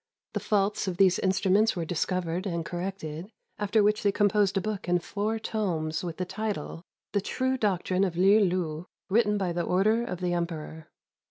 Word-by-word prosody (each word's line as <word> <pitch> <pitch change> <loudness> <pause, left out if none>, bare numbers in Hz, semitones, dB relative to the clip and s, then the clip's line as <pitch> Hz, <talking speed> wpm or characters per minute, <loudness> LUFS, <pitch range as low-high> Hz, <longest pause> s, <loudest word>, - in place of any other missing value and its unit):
The - - -1
faults 205 -1 0
of 180 -2 -2
these 190 -2 +4
instruments 195 +3 +2
were 170 -2 -2
discovered 180 +2 -1
and 170 -3 -2
corrected, 175 -1 -5 0.3
after 210 +1 +2
which 210 +1 +2
they 200 - +3
com 205 0 +3
posed 200 -2 +2
a - - +4
book 205 -2 -4
in 180 - +4
four 210 +5 -2
tomes 175 -8 -2
with 170 -2 -5
the 185 - -2
title, 200 -5 -4 0.3
"The 205 - +1
True 260 +6 -1
Doctrine 190 -5 0
of 180 -3 -1
Li 195 +4 +6
lu, 175 -4 0 0.2
written 210 -1 +3
by 185 -3 -1
the 175 - -1
Order 210 +7 +2
of 180 -6 -5
the 180 -1 -1
Emperor." 160 -2 -4
190 Hz, 185 wpm, -28 LUFS, 175-210 Hz, 0.3 s, Li